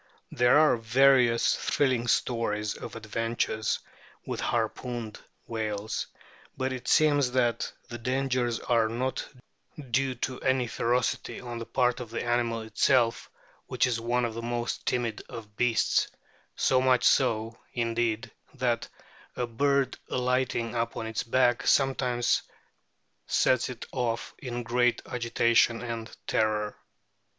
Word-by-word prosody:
There 125 +3 +4
are 155 -5 +5
various 125 0 +4
thrilling 130 -4 +1
stories 105 -4 0
of - - -8
adventures 115 0 -1 0.5
with - - -4
harpooned 120 -3 -2 0.3
whales; 110 -2 -3 0.5
but 130 0 -1
it 130 - -7
seems 145 -5 +4
that 120 -3 +1 0.2
the 120 - -7
dangers 125 -1 0
are 115 -2 +2
not 130 +3 -2 0.7
due 130 +1 +1
to 130 -1 -7
any 130 -1 +1
ferocity 120 +2 -1
on 120 -1 -6
the 115 - -7
part 125 -1 +1
of 120 -3 -7
the 115 - -3
animal 120 -1 0
itself, 115 +2 +2 0.4
which 125 0 +1
is 120 -2 -1
one 120 +1 +1
of 115 - -3
the 115 - -5
most 120 0 -3
timid 120 -3 -1
of 110 -4 -9
beasts, 120 0 +2 0.5
so 130 -1 +3
much 130 -1 +3
so, 115 -3 +2 0.2
indeed, 115 -2 -1 0.2
that - - 0 0.5
"a 125 - -1
bird 135 +2 +1
alighting 125 -2 0
upon 115 -1 -2
its 110 -1 -2
back 120 0 +2
sometimes 130 -3 +2 0.9
sets 130 0 +2
it 125 -2 -7
off 120 -3 -2
in 120 -2 -4
great 120 +1 +1
agitation 115 -1 +2
and 115 -2 -5 0.2
terror." 105 -1 0
120 Hz, 125 wpm, -28 LUFS, 115-125 Hz, 0.9 s, are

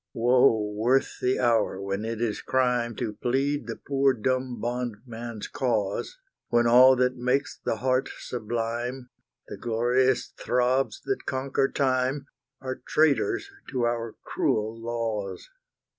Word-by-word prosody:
Woe 125 0 +4
worth 120 +6 +1
the 125 +1 +2
hour 115 -5 +2
when 100 +2 -3
it 115 -1 -3
is 115 -3 -1
crime 125 -3 +1
To 115 -4 -3
plead 135 +6 -1
the - - -4
poor 135 -1 +1
dumb 130 +1 -1
bondman's 120 -1 -5
cause, 115 - -1 0.3
When 120 0 +3
all 125 +3 +7
that 125 0 +1
makes 130 +3 0
the - - 0
heart 130 +3 0
sublime, 120 +2 -4 0.4
The - - -7
glorious 120 +2 +1
throbs 125 +2 0
that 400 - -2
conquer 135 0 0
time, 130 +1 0 0.4
Are 130 -1 -5
traitors 160 - +2 0.2
to 125 -3 0
our 115 -1 -2
cruel 110 +1 0
laws! 115 - -4
125 Hz, 130 wpm, -26 LUFS, 115-130 Hz, 0.4 s, all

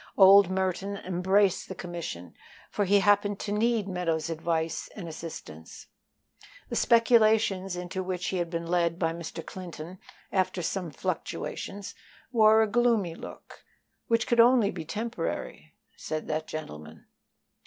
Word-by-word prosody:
Old 195 -1 +8
Merton 190 +1 -1
embraced 190 +1 +1
the 190 - -5
commission, 170 - -6 0.4
for 205 - 0
he 200 +1 +4
happened 205 0 +3
to 205 - -4
need 220 0 +1
Meadows's 170 -4 -1
advice 160 0 -2
and 185 -5 -7
assistance. 155 - -9 0.8
The - - -3
speculations 220 -5 +3
into 180 +1 -4
which 185 -1 -3
he 190 - -2
had 175 -1 -1
been 170 -1 -3
led 170 -1 +1
by 165 -2 0
Mr. 165 0 -7
Clinton, 180 -1 -8 0.3
after 185 -2 0
some 180 0 -2
fluctuations, 195 +6 -5 0.4
wore 220 -2 +6
a - - 0
gloomy 225 -6 +2
look, - - -11 0.4
"which 230 -1 +2
could 240 -2 +1
only 235 -3 +6
be 165 -3 -7
temporary," 225 +7 -5 0.2
said 155 0 -5
that 155 0 -2
gentleman. 80 - -8
185 Hz, 135 wpm, -28 LUFS, 165-205 Hz, 0.8 s, Old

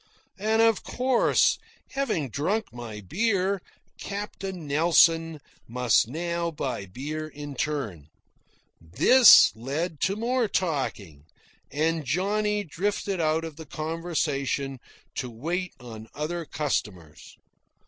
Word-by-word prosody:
And 220 +2 +3
of 225 -2 +3
course, 255 -1 +2 0.3
having 215 - -1
drunk 195 - -1
my 115 -3 -7
beer, 195 - 0 0.4
Captain 195 -3 -5
Nelson 165 +1 +3 0.3
must 120 -2 +2
now 170 +5 -2
buy 130 -10 -4
beer 150 +10 -5
in 145 -1 -8
turn. 120 - -3 0.7
This 230 - +7
led 145 +7 -3
to 195 - +1
more 240 +2 0
talking, 120 - -2 0.4
and 160 +2 0
Johnny 205 +8 0
drifted 195 +2 -2
out 160 +1 +1
of 160 -2 -8
the 160 - -9
conversation 150 -4 -2 0.3
to 125 - -4
wait 170 +10 -3
on 110 -3 -10
other 165 +4 -3
customers. 95 - -4
160 Hz, 105 wpm, -26 LUFS, 135-190 Hz, 0.7 s, This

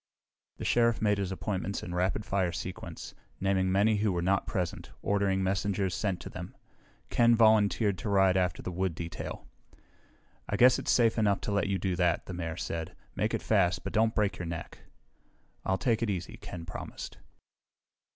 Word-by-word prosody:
The - - -6
Sheriff 115 -1 +3
made 105 -2 +2
his 95 -1 -2
appointments 95 0 -3
in 90 - -5
rapid 90 +3 0
fire 95 -3 0
sequence, 90 +2 -6 0.3
naming 95 -1 +1
many 105 +3 +3
who 105 0 +1
were 85 -1 -1
not 95 +2 +1
present, 95 -5 -3
ordering 100 -1 +1
messengers 95 0 0
sent 95 -1 -1
to - - -7
them. - - -8 0.5
Ken 120 0 +5
volunteered 110 -3 +4
to 105 - -3
ride 95 -2 +4
after 90 -1 0
the - - -4
wood 90 -1 -1
detail. 85 -1 -6 1.0
"I 100 - 0
guess 125 +3 +6
it's - - -4
safe 115 -2 +4
enough 100 -2 +3
to - - -3
let 100 0 +1
you 100 -1 0
do 95 0 -1
that," 90 -2 +1
the 95 - -6
Mayor 85 -1 -4
said. 80 -1 -4 0.2
"Make - - 0
it - - -4
fast, 90 +1 +2
but - - -5
don't 110 0 +2
break 100 -4 +1
your 90 - -4
neck." 85 -1 -6 0.9
"I'll 95 - +1
take 115 +1 +1
it 115 - 0
easy," 90 -3 -3
Ken 85 -2 -8
promised. - - -7
95 Hz, 180 wpm, -30 LUFS, 90-105 Hz, 1.0 s, guess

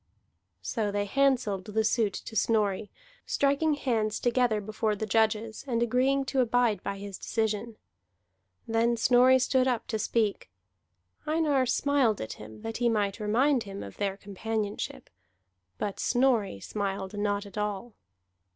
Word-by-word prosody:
So 210 - -1
they 205 0 -1
handselled 245 -6 +1
the 220 +1 0
suit 220 -2 +1
to 225 - -7
Snorri, 210 -2 +1 0.4
striking 285 +2 +2
hands 225 -6 -1
together 240 -3 +2
before 215 +1 -1
the 220 - -3
judges, 220 +1 0
and 235 -2 +1
agreeing 265 +3 +2
to 265 - -1
abide 235 -4 +2
by 200 0 -4
his 200 -1 -7
decision. 220 0 -2 0.9
Then 230 +1 +2
Snorri 250 +2 +5
stood 260 0 +2
up 240 -3 0
to 220 - -1
speak. 215 - 0 0.8
Einar 300 -4 +2
smiled 260 -4 +2
at 110 - -5
him 110 0 -11
that 225 0 -4
he 240 -1 +2
might 205 -2 0
remind 245 +6 +2
him 200 -2 -7
of 100 - -10
their 195 -1 -1
companionship, 205 - -4 0.7
but 200 - -3
Snorri 240 - +2
smiled 195 - -4
not 205 0 -1
at 200 - -12
all. 210 +2 -3
220 Hz, 140 wpm, -28 LUFS, 205-245 Hz, 0.9 s, Snorri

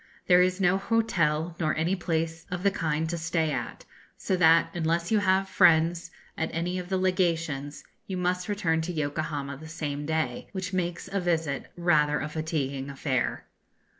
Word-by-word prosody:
There 180 0 +6
is 185 +1 +2
no 190 0 +3
hotel 175 -7 +1
nor 155 -2 +1
any 165 +5 +1
place 165 -2 -2
of 180 0 -4
the 200 - +4
kind 160 -4 -1
to 170 +1 -3
stay 160 -1 0
at; - - -5 0.3
so 190 - -1
that, 165 -1 +5
unless 170 +1 0
you 215 - +4
have 190 -1 +2
friends 170 -2 +4 0.3
at 160 - -2
any 175 +2 -1
of 180 0 -7
the 190 - +1
Legations, 165 -6 0 0.2
you 190 - -3
must 180 +1 -1
return 165 -6 +1
to 170 +3 -3
Yokohama 145 -2 -3
the 160 +3 -10
same 145 -2 -4
day, 160 +10 -1
which 190 -1 -4
makes 175 -1 -2
a 195 +1 -2
visit 165 -6 -1
rather 150 -4 +3
a 150 - -3
fatiguing 145 -4 -3
affair. 135 -1 -2
165 Hz, 170 wpm, -27 LUFS, 155-180 Hz, 0.3 s, There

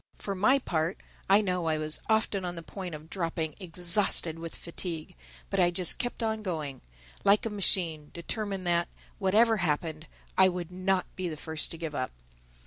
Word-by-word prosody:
For 200 - -4
my 215 +8 +4
part, 170 -8 -1 0.3
I 200 +2 +7
know 180 -4 -1
I 155 -1 +2
was 155 0 +4
often 220 -3 +1
on 175 -1 -3
the 165 - -7
point 180 0 -6
of 155 +1 -11
dropping 165 -3 -3
exhausted 175 -2 +2
with 165 0 -7
fatigue; 170 -2 -5 0.4
but - - 0
I 175 - +5
just 175 0 +4
kept 245 -1 -3
on 220 -1 -1
going—like 140 - -1
a 225 - -2
machine—determined 185 +1 0
that, 170 0 +2 0.3
whatever 220 +4 +4
happened, 155 -2 -1 0.3
I 190 0 +8
would 180 -1 -5
not 185 +1 0
be 185 -2 -3
the 155 - -6
first 160 0 -2
to 165 - -7
give 160 -2 -5
up. 130 -3 -2
175 Hz, 170 wpm, -29 LUFS, 160-195 Hz, 0.4 s, I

